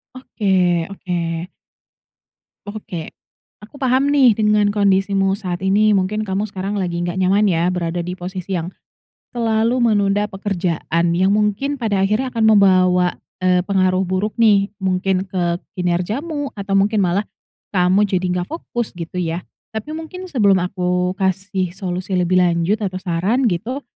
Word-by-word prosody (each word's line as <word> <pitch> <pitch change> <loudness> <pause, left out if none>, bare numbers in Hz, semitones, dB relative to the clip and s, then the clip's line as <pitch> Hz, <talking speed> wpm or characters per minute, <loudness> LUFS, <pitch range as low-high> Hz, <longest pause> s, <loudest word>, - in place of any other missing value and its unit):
Oke 185 -9 0
oke. 170 -3 -3 1.2
Oke, 205 -6 -7 0.5
aku 210 +5 -15
paham 265 0 +1
nih 275 -4 +5
dengan 210 -1 +3
kondisimu 195 -1 +2
saat 180 -4 -4
ini 205 +3 +3
mungkin 205 +2 +1
kamu 200 +1 -2
sekarang 195 +1 -4
lagi 175 -2 -2
nggak 175 +2 -3
nyaman, 195 +3 +3
ya, 170 0 +1
berada 175 -1 -2
di 180 +1 -4
posisi 185 +1 -5
yang 170 +1 -3 0.6
selalu 230 +1 +1
menunda 205 -2 +2
pekerjaan 175 -4 -1
yang 190 +2 +3
mungkin 215 +7 0
pada 200 -4 +1
akhirnya 215 +6 0
akan 230 -3 0
membawa, 185 -4 +4 0.2
eee, 180 -1 +2
pengaruh 185 -1 +1
buruk, 190 +5 -2
nih, 205 -3 +4
mungkin 190 -1 0
ke 175 -2 -1 0.2
kinerjamu 220 - -2
atau 195 -1 -1
mungkin 205 +2 +2
malah 190 +3 +1 0.5
kamu 185 +2 +3
jadi 185 -2 -1
nggak 175 - -3
fokus 240 -10 -4
gitu, 170 +1 -7
ya, 170 -1 -2 0.3
tapi 220 +6 -5
mungkin 365 +3 -8
sebelum 200 - +3
aku 180 0 -1
kasih 190 -1 -1
solusi 185 0 -4
lebih 180 0 +2
lanjut 175 +3 +2
atau 185 -1 -4
saran 195 +9 +1
gitu, 230 +10 -3
195 Hz, 145 wpm, -19 LUFS, 180-210 Hz, 1.2 s, nih